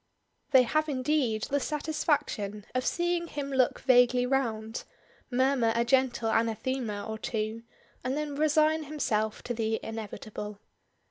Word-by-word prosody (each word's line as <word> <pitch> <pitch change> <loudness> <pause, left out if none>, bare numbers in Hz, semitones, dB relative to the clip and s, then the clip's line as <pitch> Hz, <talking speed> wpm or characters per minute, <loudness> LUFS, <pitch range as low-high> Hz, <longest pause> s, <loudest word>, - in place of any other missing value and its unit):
They 260 -3 +7
have 310 +5 0
indeed 255 -5 0
the 285 - 0
satisfaction 285 -9 -1
of 255 0 0
seeing 345 0 0
him 280 -3 -4
look 260 -2 +2
vaguely 245 -1 +5
round, 230 -4 -1 0.5
murmur 255 -2 +2
a 235 0 +2
gentle 245 -3 +2
anathema 225 -1 -1
or 220 0 -5
two, 220 0 -3 0.4
and 255 +3 -1
then 300 -1 -2
resign 310 +1 +3
himself 220 -8 -1
to 245 - -3
the 220 -1 -1
inevitable. 210 -1 -6
250 Hz, 130 wpm, -29 LUFS, 220-285 Hz, 0.5 s, They